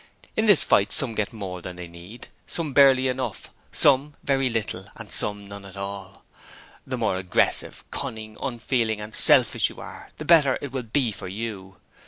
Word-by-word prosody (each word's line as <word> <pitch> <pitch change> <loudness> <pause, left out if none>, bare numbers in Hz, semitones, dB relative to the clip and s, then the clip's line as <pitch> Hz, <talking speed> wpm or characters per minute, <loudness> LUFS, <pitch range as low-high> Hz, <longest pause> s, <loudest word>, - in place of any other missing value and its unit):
In 220 0 +1
this 205 -6 +6
fight 100 - +3
some 125 -4 +3
get 105 -2 -2
more 95 -5 -7
than 90 +1 -7
they 90 -1 -8
need, 85 +7 -12 0.2
some 160 -5 -3
barely 135 -2 +6
enough, 130 -4 -4 0.2
some 140 +2 +3
very 135 -2 +1
little, 115 -2 -4
and - - -11
some 105 -1 +1
none 100 0 -9
at 100 0 -12
all. 100 0 -7 0.6
The - - -3
more 95 - 0
aggressive, 95 -1 0
cunning, 110 -1 -5
unfeeling 115 -3 -1
and 105 +1 -8
selfish - - +5
you - - -12
are - - -10
the 155 - -7
better 150 -5 +5
it 140 - -7
will 130 0 -3
be 120 +1 0
for 100 - -8
you. 95 -2 -6
110 Hz, 180 wpm, -24 LUFS, 100-130 Hz, 0.6 s, this